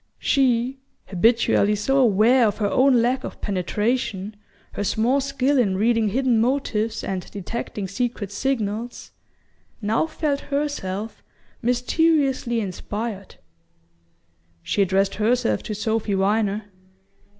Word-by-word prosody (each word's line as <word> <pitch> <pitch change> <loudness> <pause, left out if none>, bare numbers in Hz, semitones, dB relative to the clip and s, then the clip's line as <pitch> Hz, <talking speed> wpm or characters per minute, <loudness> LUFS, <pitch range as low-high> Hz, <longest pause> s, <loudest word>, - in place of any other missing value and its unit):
She, 260 -1 +1 0.3
habitually 210 +1 +3
so 270 +7 0
aware 235 +1 +4
of 205 - -2
her 205 -2 0
own 255 -3 +4
lack 255 +2 0
of - - -7
penetration, 205 +1 -2 0.4
her - - -4
small 235 +7 +1
skill 275 0 +1
in 195 -6 +1
reading 225 +1 +2
hidden 240 +1 +2
motives 225 -3 -1
and 185 -2 -4
detecting 205 0 -5
secret 220 -1 -3
signals, 230 0 -3 0.7
now 225 +7 0
felt 300 -3 -1
herself 280 -9 -3 0.4
mysteriously 255 -1 +1
inspired. 205 +1 -5 1.3
She 205 - 0
addressed 195 +1 +2
herself 235 +3 +1
to 215 - -5
Sophy 220 -1 -1
Viner. 205 +1 +1
225 Hz, 110 wpm, -23 LUFS, 205-255 Hz, 1.3 s, aware